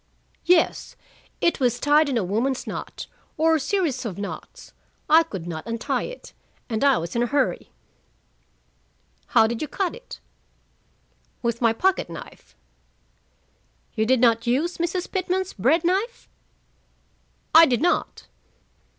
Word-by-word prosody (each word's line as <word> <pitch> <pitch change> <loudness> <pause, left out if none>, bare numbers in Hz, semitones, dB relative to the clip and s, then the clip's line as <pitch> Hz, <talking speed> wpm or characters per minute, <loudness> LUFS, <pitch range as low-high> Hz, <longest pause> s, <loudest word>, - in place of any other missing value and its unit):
"Yes. 345 -2 +2 0.5
It 340 - +2
was 245 -2 +1
tied 295 +1 +3
in 260 - 0
a 220 - 0
woman's 235 +8 -1
knot, - - -6 0.3
or 320 0 +3
series 285 -3 -1
of 210 -7 -5
knots. 205 - -8 0.3
I 320 +2 +7
could 195 - -6
not 160 0 -6
untie 230 0 -2
it, - - -12 0.4
and 220 +2 -1
I 275 -2 +5
was 165 +4 -5
in 235 - +1
a 240 - +1
hurry." 260 -9 -1 1.6
"How 220 - +4
did 225 +1 -3
you 310 - -2
cut 365 +4 -2
it?" - - -11 1.2
"With 235 0 -1
my 230 -2 +4
pocket 375 +11 0
knife." - - -11 1.4
"You 220 -1 0
did 260 0 +3
not 230 -1 +3
use 305 +10 0
Mrs. 345 +1 -2
Pitman's 375 0 -2
bread 275 - +2
knife?" 390 +8 -1 1.3
"I 325 +1 +9
did 250 +3 0
not." 350 - 0
270 Hz, 135 wpm, -23 LUFS, 230-340 Hz, 1.6 s, I